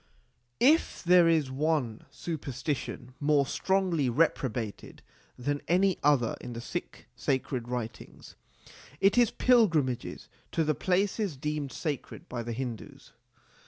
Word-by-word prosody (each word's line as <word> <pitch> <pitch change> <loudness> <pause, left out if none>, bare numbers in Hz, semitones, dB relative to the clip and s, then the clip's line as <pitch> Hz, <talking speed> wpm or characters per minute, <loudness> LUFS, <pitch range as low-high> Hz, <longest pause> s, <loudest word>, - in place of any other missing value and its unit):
If 300 +7 +3
there 175 -1 +6
is 155 -5 +2
one 135 -5 -1
superstition 135 -4 -4
more 145 -1 +3
strongly 180 -4 +1
repro 135 -1 +2
bated 110 -3 -6 0.3
than 145 +3 -2
another 155 - +3
in 120 - -7
the 115 - -5
Sikh 120 - -6
sacred 130 -2 -1
writings, 120 -2 -6 0.6
it 195 +1 +4
is 240 -3 +5
pilgrimages 165 - +2 0.3
to 165 - +2
the 155 0 +1
places 190 - 0
deemed 150 0 -3
sacred 145 -3 -5
by 120 -1 -4
the 115 0 -4
Hindus. 120 -2 -7
145 Hz, 120 wpm, -29 LUFS, 125-175 Hz, 0.6 s, there